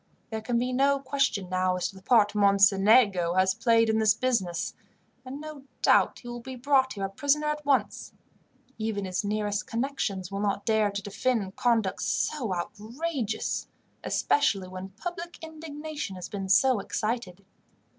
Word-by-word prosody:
There 220 0 -3
can 235 +2 -1
be 250 +2 -1
no 275 +2 +3
question 270 -8 0
now 185 0 +1
as 180 - -1
to - - -12
the 190 - -12
part 210 -1 +4
Mocenigo 200 -2 +4
has 185 0 +3
played 230 +1 +3
in 220 0 +2
this 215 -1 +4
business, 195 -9 -1 0.5
and 265 +2 -7
no 305 -3 -9 0.2
doubt - - +4
he 245 - -12
will 240 0 -6
be 260 +2 -8
brought 260 +1 +2
here 195 -2 -3
a - - -4
prisoner 285 +7 +1
at 300 0 -2
once. 275 -2 0 0.7
Even 215 -2 -2
his 185 +1 -2
nearest 205 0 -2
connections 225 -7 -2
will 200 - -3
not 200 -1 -1
dare 220 -2 +2
to 200 0 -5
defend 205 -1 -1
conduct 225 -5 +1
so 255 -9 -1
outrageous, 220 - -3 0.4
especially 200 -10 +1
when 185 +1 -7
public 345 - -7
indignation 310 -7 -6
has 180 - -7
been 195 -2 -5
so 255 +3 +4
excited. 200 -3 -3
220 Hz, 160 wpm, -27 LUFS, 195-265 Hz, 0.7 s, part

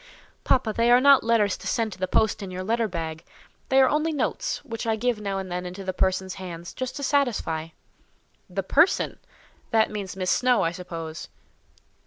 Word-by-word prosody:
"Papa, 245 -4 +2
they 230 +2 +2
are 245 +1 +7
not 280 +1 +6
letters 225 -4 +2
to - - -8
send 225 -3 0
to 185 - -13
the 185 - -1
post 215 +3 +1
in 195 - -5
your 185 0 -5
letter 225 +3 0
bag; 165 -3 -5 0.5
they 265 - +5
are 265 - +6
only 305 +3 +1
notes, 410 - -1
which 230 -3 -5
I 225 - +2
give 235 -1 -1
now 200 -1 -2
and 190 -1 -5
then 180 0 -2
into 185 +2 -7
the 185 0 -3
person's 190 0 0
hands, 170 -2 -7
just 255 -1 -4
to 285 - -5
satisfy." 240 - 0 0.8
"The - - -3
person! - - +2 0.5
That 220 -1 +3
means 200 -3 -5
Miss 185 -1 -1
Snowe, 250 -2 +3
I 165 - +1
suppose?" 165 -3 -7
210 Hz, 195 wpm, -25 LUFS, 185-245 Hz, 0.8 s, are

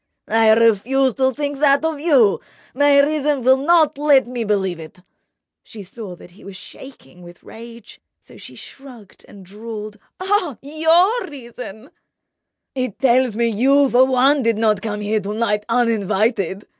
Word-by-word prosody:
"I 225 0 +3
refuse 230 +4 +2
to 260 +1 0
think 285 +1 -5
that 280 +1 +2
of 320 -2 -3
you. 275 - +2 0.3
My 285 +1 +3
reason 295 -2 -1
will 260 +2 +5
not 305 0 +2
let 290 -3 +3
me 245 -1 -5
believe 190 -5 -2
it." 160 +1 -12 0.6
She 210 -2 -12
saw 195 -1 -10
that 175 - -16
he 185 - -19
was 195 -1 -11
shaking 185 - -14
with 175 0 -15
rage; 230 0 -14 0.2
so - - -19
she - - -12
shrugged 250 -7 -14
and 195 -2 -15
drawled: 210 +1 -9 0.2
"Oh, 370 - -1
your 330 - +1
reason—!" 240 -3 -11 0.8
"It 255 -6 -4
tells 255 -3 +1
me 235 +1 0
you 270 +5 +2
for 250 +2 +5
one 265 +2 +2
did 230 -3 0
not 215 -3 0
come 210 -1 -5
here 215 +1 -1
to 205 +1 -6
night 210 -2 -2
uninvited." 215 -4 -1
235 Hz, 155 wpm, -19 LUFS, 210-280 Hz, 0.8 s, will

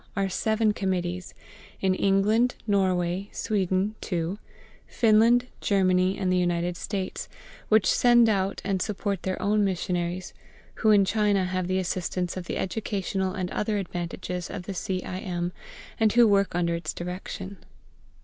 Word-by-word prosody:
are 195 -1 +1
seven 220 +3 +1
Committees 180 -2 -2 0.4
in 190 -1 +2
England, 205 +6 +2
Norway, 190 -2 +1
Sweden 195 -1 0 0.2
(two), 175 +2 -2 0.5
Finland, 230 +2 +4 0.2
Germany, 185 -1 +2
and 185 -1 0
the 180 - +3
United 175 0 0
States 195 0 -4 0.4
which 215 -2 +5
send 240 -1 +5
out 195 -2 0
and 195 -2 0
support 200 -2 -2
their 190 0 -3
own 210 +1 +2
missionaries, 180 -1 -2 0.5
who 220 - +4
in 205 -2 +6
China 205 -2 +2
have 185 0 -2
the 185 0 0
assistance 180 -1 -2
of 185 -1 -5
the - - -3
educational 190 -2 -2
and 185 -2 -3
other 210 0 -1
advantages 180 -1 -4
of 180 - -6
the 195 - -5
C. 185 0 -3
I. 185 - -5
M., 175 -2 -3 0.5
and 220 -1 +4
who 240 -1 +6
work 200 -3 +2
under 170 -1 +1
its 170 0 -4
direction. 185 +2 -6
190 Hz, 150 wpm, -26 LUFS, 180-205 Hz, 0.5 s, in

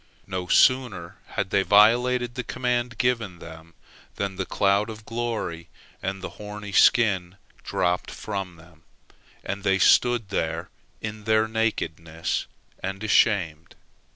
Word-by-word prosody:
No 90 -1 -4
sooner 120 -8 +2 0.2
had 95 - -1
they 100 - +3
violated 120 +5 +4
the 125 0 -4
command 125 -2 -2
given 115 -7 0
them 80 0 -12 0.4
than 100 -1 -3
the 95 -1 -4
cloud 100 +2 +2
of 110 -1 -9
glory 115 -8 -4 0.3
and 95 0 -4
the - - -2
horny 105 0 -7
skin 95 -5 +3 0.3
dropped 90 0 -1
from 95 -4 -5
them, 80 -1 -19 0.6
and 100 +1 -4
they 95 -1 +3
stood 120 +1 +4
there 80 -2 -2 0.3
in 105 -1 -6
their 110 0 +3
nakedness, 85 -8 -2 0.3
and 95 +2 -4
ashamed. 90 -7 +1
100 Hz, 125 wpm, -25 LUFS, 90-115 Hz, 0.6 s, violated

